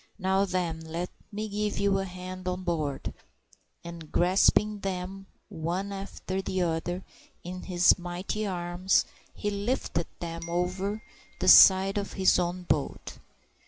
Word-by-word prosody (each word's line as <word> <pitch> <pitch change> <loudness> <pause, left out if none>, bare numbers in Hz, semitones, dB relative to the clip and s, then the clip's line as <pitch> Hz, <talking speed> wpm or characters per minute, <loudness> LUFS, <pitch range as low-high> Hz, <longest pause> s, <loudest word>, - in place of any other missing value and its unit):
"Now, 190 0 +2
then, 180 -4 -2
let 165 +2 -5 0.2
me 215 +1 -4
give 210 0 -2
you 200 -1 +2
a 195 - -2
hand 185 0 -8
on 180 0 -2
board;" 155 -6 -2 0.7
and 170 -2 -9
grasping 205 +4 +3
them 195 0 -5 0.2
one 175 +5 -3
after 195 -1 -4
the 185 -1 -1
other 175 +2 -2 0.4
in 180 +1 -6
his 180 0 +4
mighty 180 +4 -3
arms, 175 0 +1 0.3
he 205 - -3
lifted 200 -5 -1
them 165 -1 -6
over 185 +4 -2 0.4
the - - -1
side 195 +1 +8
into 200 - -6
his 190 -2 +4
own 180 +1 -2
boat. 150 -5 -2
185 Hz, 135 wpm, -28 LUFS, 175-195 Hz, 0.7 s, side